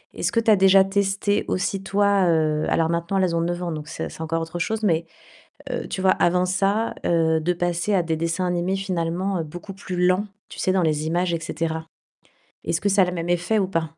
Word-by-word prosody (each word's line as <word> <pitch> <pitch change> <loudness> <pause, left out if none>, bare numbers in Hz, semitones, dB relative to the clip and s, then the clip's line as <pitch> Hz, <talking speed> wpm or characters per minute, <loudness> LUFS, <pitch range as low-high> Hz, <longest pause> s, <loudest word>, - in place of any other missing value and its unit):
Est-ce - - -1
que 230 - +2
tu 225 - +1
as - - +7
déjà 190 0 +6
testé 200 +1 0
aussi 195 +1 -1
toi, 200 -1 +2
heu, 155 -2 +1
alors 165 0 +2
maintenant 170 +3 -1
elles 180 -3 +1
ont 165 - +1
9 175 +1 -2
ans, 170 - -2
donc, 150 -1 -6
c'est - - -5
c'est - - -10
encore 165 +1 -1
autre 165 +1 -5
chose, 220 +5 -1
mais, 165 -4 +2 0.6
heu, - - -3
tu - - -4
vois 190 - +4
avant 180 +1 +2
ça, 200 +4 0
heu, 160 -1 +2
de 180 +3 +1
passer 175 +3 -1
à 180 -3 +3
des 165 -1 -1
dessins 165 +3 -1
animés 180 +2 0
finalement 180 -1 -2
beaucoup 175 +5 -9
plus 180 -2 -2
lents, 185 +3 +2 0.2
tu - - -11
sais 185 - +1
dans 190 -1 +2
les 155 -1 0
images 175 +1 0
et 165 - -1
cetera. 160 0 -3 0.8
Est-ce 165 - -1
que 200 - +1
ça 195 0 +4
a - - +3
le 180 - -3
même 170 0 -4
effet 175 +5 +1
ou 190 - +1
pas? 165 -3 -1
175 Hz, 230 wpm, -23 LUFS, 165-195 Hz, 0.8 s, as